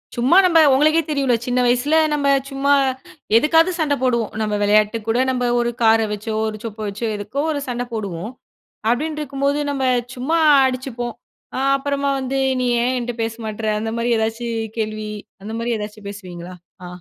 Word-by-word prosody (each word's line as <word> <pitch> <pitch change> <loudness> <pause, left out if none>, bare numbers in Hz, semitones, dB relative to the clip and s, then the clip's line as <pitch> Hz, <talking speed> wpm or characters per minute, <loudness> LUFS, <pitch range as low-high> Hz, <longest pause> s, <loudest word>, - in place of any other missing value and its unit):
சும்மா 255 +8 +3
நம்ம 335 -2 +5
உங்களுக்கே 310 +4 +4
தெரியும்ல, 275 -5 +1
சின்ன 250 0 0
வயசுல 250 +6 +2 0.2
நம்ம 285 -1 0 0.2
சும்மா 280 +1 +1 0.6
எதுக்காவது 325 +7 +4
சண்ட 295 -3 +1
போடுவோம். 235 -4 0
நம்ம 210 -1 -1
விளையாட்டுக்கு 215 +2 +2
கூட 230 +2 +2
நம்ப 250 -1 -1
ஒரு 240 0 0
கார 225 0 +5
வச்சோ, 215 +1 -4
ஒரு 215 0 -4
சொப்ப 220 -1 -7
வச்சோ 210 +4 -5
எதுக்கோ 245 +7 -3
ஒரு 290 -2 -2
சண்ட 245 0 -3
போடுவோம். 200 0 -4 0.6
அப்படின்னு 300 +6 -1
இருக்கும்போது 280 0 -1
நம்ம 275 -2 -2 0.3
சும்மா 290 +7 0 0.3
அடிச்சுப்போம். 255 -2 -3 0.4
அ - - -1 0.2
அப்புறமா 280 0 -1
வந்து, 265 +1 -2 0.2
"நீ 250 - 0 0.2
ஏன் 255 +1 +1
என்ட்ட 245 0 -4
பேச 225 0 -2
மாட்ற?" 220 0 -5
அந்த 225 +1 -3
மாரி 235 +1 0
எதாச்சும் 225 +1 -2 0.2
கேள்வி 215 -1 -3 0.3
அந்த 220 +2 -6
மாரி 235 +1 -1
எதாச்சும் 210 0 -7
பேசுவீங்களா? 180 -3 -9 0.3
ஆ. - - -7
240 Hz, 165 wpm, -20 LUFS, 220-275 Hz, 0.6 s, நம்ம